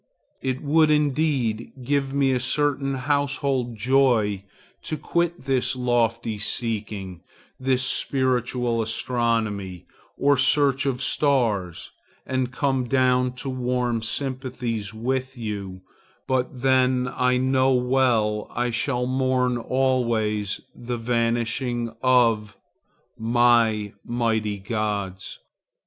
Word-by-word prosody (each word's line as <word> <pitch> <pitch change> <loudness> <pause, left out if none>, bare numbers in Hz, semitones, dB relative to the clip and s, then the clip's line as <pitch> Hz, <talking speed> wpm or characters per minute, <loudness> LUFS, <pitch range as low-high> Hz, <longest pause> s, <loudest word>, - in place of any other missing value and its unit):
It 130 +1 -2
would 155 +2 +4
indeed 145 -6 +1
give 140 +1 0
me 135 -1 +2
a 125 - +1
certain 135 +1 0
household 140 -2 -1
joy 110 -4 +2 0.4
to 155 - -4
quit 170 +2 -1
this 135 -1 +1
lofty 115 -3 0
seeking, 105 -5 -3 0.4
this 130 0 +1
spiritual 125 -3 0
astronomy 110 -5 -1 0.3
or 140 0 +3
search 140 0 +3
of 130 -1 -1
stars, 115 - 0 0.3
and 130 -1 -1
come 135 -1 0
down 125 0 +2
to 135 +2 -6
warm 125 -2 -1
sympathies 125 -3 -3
with 130 +4 -3
you; 100 -5 -5 0.4
but 130 -1 -1
then 130 -1 +3
I 125 0 +2
know 130 +1 +2
well 125 -4 +1
I 120 0 0
shall 125 +1 0
mourn 130 -1 +1
always 115 -6 0
the 120 0 -5
vanishing 115 0 -1
of 115 -5 +2 0.6
my 115 -2 +3
mighty 110 -3 -1
gods. 100 -2 -3
125 Hz, 100 wpm, -24 LUFS, 115-130 Hz, 0.6 s, would